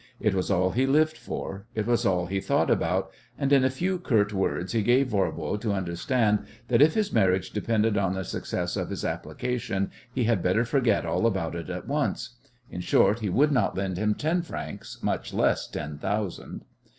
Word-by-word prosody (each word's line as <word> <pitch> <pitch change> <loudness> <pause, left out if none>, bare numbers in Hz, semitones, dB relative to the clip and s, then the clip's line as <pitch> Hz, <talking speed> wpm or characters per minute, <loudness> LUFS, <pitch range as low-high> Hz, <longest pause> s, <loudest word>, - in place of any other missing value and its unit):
It 105 - +1
was 95 -1 -1
all 95 -1 +2
he 130 +5 +1
lived 155 +3 +3
for; 100 +2 -6
it 110 -1 -1
was 120 0 +2
all 90 -2 +1
he 95 +3 -2
thought 95 - +1
about; 95 +3 +1 0.3
and 140 -1 +1
in 135 -2 +6
a 130 - +4
few 180 +8 -1
curt 105 -10 +1
words 95 -2 -1
he 115 - +1
gave 125 +5 +3
Voirbo 95 -4 -1
to 105 -3 0
understand 105 +4 +1 0.3
that 125 +1 +4
if 155 +2 +6
his 215 -2 0
marriage 95 -4 +2
depended 110 0 +1
on 95 -1 0
the 95 - -3
success - - -3
of - - -2
his - - -4
application 110 -6 -2 0.2
he 125 0 -1
had 110 -5 +2
better 95 +7 +2
forget 120 -5 +2
all 115 - +1
about 95 -7 -1
it 85 0 -6
at 90 +4 -5
once. 145 -2 -1 0.4
In 90 - -5
short, 100 +4 +3
he 105 -3 -2
would 145 +11 +3
not 125 -9 +1
lend 95 -2 -2
him 105 0 +1
ten 165 +4 0
francs, 170 - -7
much - - -2
less - - +2
ten 75 -1 -6
thousand. 100 0 -3
105 Hz, 200 wpm, -27 LUFS, 95-125 Hz, 0.4 s, in